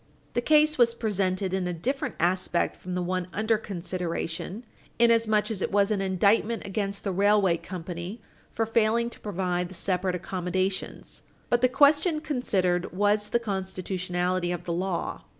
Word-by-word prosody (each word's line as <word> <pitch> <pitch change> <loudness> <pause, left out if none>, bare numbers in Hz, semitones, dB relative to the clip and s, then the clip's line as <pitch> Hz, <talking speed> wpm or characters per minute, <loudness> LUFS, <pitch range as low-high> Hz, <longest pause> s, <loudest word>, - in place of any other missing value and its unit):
The 240 - +1
case 305 +1 +4
was 235 -1 +4
presented 195 -4 -1
in 190 -1 0
a 180 - -2
different 265 - -2
aspect 180 0 +1
from 180 0 -6
the 180 - -1
one 180 0 -2
under 220 +1 +1
consideration, 180 +2 -4 0.3
inasmuch 225 -2 +3
as 200 -4 -3
it - - -1
was 200 +1 +3
an 205 -2 +1
indictment 200 +4 +2
against 200 0 -2
the 195 - -1
railway 195 -2 +3
company 175 +4 -6 0.3
for 225 - 0
failing 230 +1 +2
to - - -8
provide 180 -3 -2
the 185 - -9
separate 185 0 -1
accommodations, 185 +1 -3 0.3
but 240 0 +3
the 255 - +4
question 295 +5 +4
considered 190 - 0
was 205 +2 +2
the - - +3
constitutionality 185 -3 -2
of 175 -1 -4
the 170 - -3
law. 180 0 -2
195 Hz, 155 wpm, -27 LUFS, 180-225 Hz, 0.3 s, case